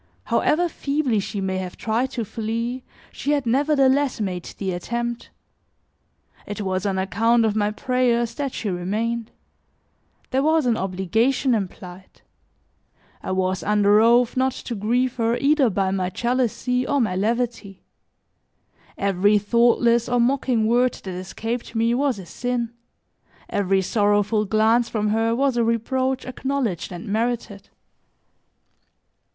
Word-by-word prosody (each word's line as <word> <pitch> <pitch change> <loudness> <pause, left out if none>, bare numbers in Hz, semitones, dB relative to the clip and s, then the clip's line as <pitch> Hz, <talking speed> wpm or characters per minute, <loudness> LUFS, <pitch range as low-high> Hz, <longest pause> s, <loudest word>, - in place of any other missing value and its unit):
However 350 +4 +2
feebly 280 -7 -1
she 200 0 -4
may 190 -1 -1
have 185 -1 -6
tried 230 +4 -1
to 235 -3 -2
flee, 230 +4 -3 0.3
she 290 - -1
had 285 -3 0
nevertheless 275 +1 +2
made 185 -4 -3
the 190 -2 -2
attempt. 235 +6 -4 1.2
It 205 0 -5
was 190 0 -1
on 195 -1 -1
account 225 +5 +2
of 215 -1 0
my 210 -1 +1
prayers 240 0 0
that 275 +1 -3
she 210 -5 -3
remained; 215 +6 -2 1.0
there 265 - +2
was 315 0 +2
an 240 -2 +2
obligation 220 +8 0
implied. 185 -3 -6 1.0
I - - -6
was 185 0 0
under 210 0 +3
oath 240 +1 +4
not 260 0 +1
to 240 - -6
grieve 240 +4 0
her 230 0 +1
either 280 -3 +3
by 195 -1 0
my 185 -1 -1
jealousy 250 +3 -1
or 285 -1 +1
my 210 -7 0
levity; 225 -1 -2 1.1
every 200 +1 +3
thoughtless 235 +2 +3
or 245 0 +2
mocking 245 -2 +1
word 245 +2 +3
that 190 - -8
escaped 225 +7 -5
me 230 +1 +2
was 265 -2 +1
a 190 - -9
sin, 235 +5 -3 0.8
every 195 -1 +1
sorrowful 205 +1 +1
glance 220 +3 +2
from 210 -2 -1
her 225 +2 +1
was 270 -1 +1
a 235 - +3
reproach 255 +3 0
acknowledged 255 - -3
and 175 -1 -8
merited. 220 -1 -2
230 Hz, 135 wpm, -23 LUFS, 200-250 Hz, 1.2 s, oath